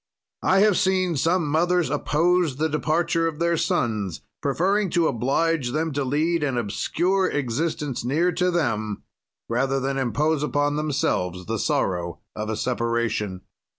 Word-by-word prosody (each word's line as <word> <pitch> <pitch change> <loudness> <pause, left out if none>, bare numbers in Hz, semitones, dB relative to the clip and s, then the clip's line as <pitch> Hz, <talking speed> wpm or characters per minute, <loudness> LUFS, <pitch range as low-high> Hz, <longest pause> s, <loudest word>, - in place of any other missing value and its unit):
"I 190 +1 +3
have 210 -3 +4
seen 185 -2 +1
some 165 +3 +1
mothers 170 0 +1
oppose 160 +1 +1
the 155 +3 0
departure 165 +2 +1
of 160 -2 -4
their 170 +1 +1
sons, 115 - -1 0.2
preferring 190 +8 +1
to 170 -1 +2
oblige 135 +2 0
them 160 +1 0
to 140 0 -1
lead 155 +5 +1
an 135 -4 0
obscure 175 - 0
existence 145 0 -2
near 155 +9 +1
to 180 +1 +1
them, 110 - -1 0.4
rather 135 +3 0
than 135 +1 -1
impose 145 +5 +1
upon 145 -1 0
themselves 90 - -1
the 110 0 -2
sorrow 85 -4 -1 0.2
of 110 0 -4
a 110 - -2
separation. 115 -5 -1
150 Hz, 145 wpm, -24 LUFS, 120-170 Hz, 0.4 s, have